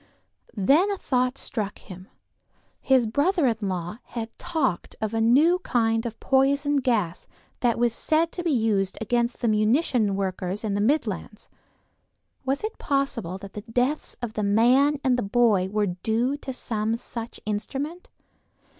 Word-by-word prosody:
Then 285 Hz, -, +4 dB
a 400 Hz, -, -1 dB
thought 255 Hz, -4 st, 0 dB
struck 210 Hz, -4 st, -3 dB
him; 185 Hz, 0 st, -12 dB, 0.7 s
his 260 Hz, -3 st, +3 dB
brother 290 Hz, -, +1 dB
in 230 Hz, -3 st, +2 dB
law 180 Hz, +3 st, -4 dB
had 230 Hz, -1 st, -6 dB
talked 310 Hz, -, -2 dB
of 220 Hz, 0 st, -2 dB
a 225 Hz, -, +1 dB
new 295 Hz, +11 st, +4 dB
kind 225 Hz, -5 st, 0 dB
of 230 Hz, -, -8 dB
poison 280 Hz, +2 st, +2 dB
gas 220 Hz, -10 st, 0 dB, 0.3 s
that 240 Hz, -2 st, +1 dB
was 235 Hz, -1 st, +2 dB
said 320 Hz, +6 st, +1 dB
to 350 Hz, -, -5 dB
be 340 Hz, -, 0 dB
used 220 Hz, -8 st, +1 dB
against 235 Hz, +2 st, -1 dB
the 235 Hz, -, +1 dB
munition 215 Hz, 0 st, +2 dB
workers 190 Hz, +1 st, -3 dB
in 210 Hz, -2 st, -1 dB
the 205 Hz, -, 0 dB
Midlands: 220 Hz, -4 st, -1 dB, 0.9 s
was 270 Hz, +5 st, -1 dB
it 435 Hz, +1 st, -4 dB
possible 270 Hz, -10 st, -1 dB
that 195 Hz, 0 st, -11 dB
the 210 Hz, -, -6 dB
deaths 245 Hz, +7 st, -1 dB
of 225 Hz, -2 st, -3 dB
the 215 Hz, -, -2 dB
man 250 Hz, +8 st, +4 dB
and 255 Hz, -2 st, +2 dB
the -, -, 0 dB
boy 205 Hz, -3 st, +2 dB
were 210 Hz, +1 st, +1 dB
due 220 Hz, +8 st, -1 dB
to 280 Hz, -2 st, -6 dB
some 225 Hz, -3 st, -2 dB
such 230 Hz, 0 st, -6 dB
instrument? 275 Hz, -, -4 dB
235 Hz, 155 wpm, -25 LUFS, 210-275 Hz, 0.9 s, Then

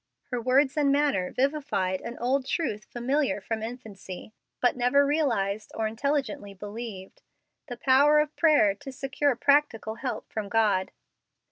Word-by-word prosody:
Her 245 Hz, -1 st, -1 dB
words 265 Hz, +4 st, +2 dB
and 285 Hz, -2 st, +3 dB
manner 280 Hz, -11 st, +1 dB
vivified 265 Hz, -10 st, -1 dB
an 235 Hz, -, -7 dB
old 260 Hz, +2 st, 0 dB
truth 210 Hz, -11 st, -2 dB
familiar 265 Hz, +1 st, -1 dB
from 220 Hz, +3 st, -4 dB
infancy, 215 Hz, -4 st, -8 dB, 0.3 s
but 245 Hz, -, +2 dB
never 255 Hz, +3 st, +3 dB
realized 225 Hz, -9 st, 0 dB
or 220 Hz, -, -1 dB
intelligently 225 Hz, -4 st, -2 dB
believed 205 Hz, -1 st, -8 dB, 0.5 s
the 245 Hz, -3 st, -6 dB
power 275 Hz, +4 st, +5 dB
of 300 Hz, 0 st, -1 dB
prayer 300 Hz, -11 st, +4 dB
to 270 Hz, +7 st, -10 dB
secure 270 Hz, +1 st, 0 dB
practical 265 Hz, -5 st, +2 dB
help 260 Hz, -, -4 dB
from 210 Hz, -2 st, -3 dB
God. 205 Hz, -4 st, +2 dB
245 Hz, 140 wpm, -27 LUFS, 210-280 Hz, 0.5 s, power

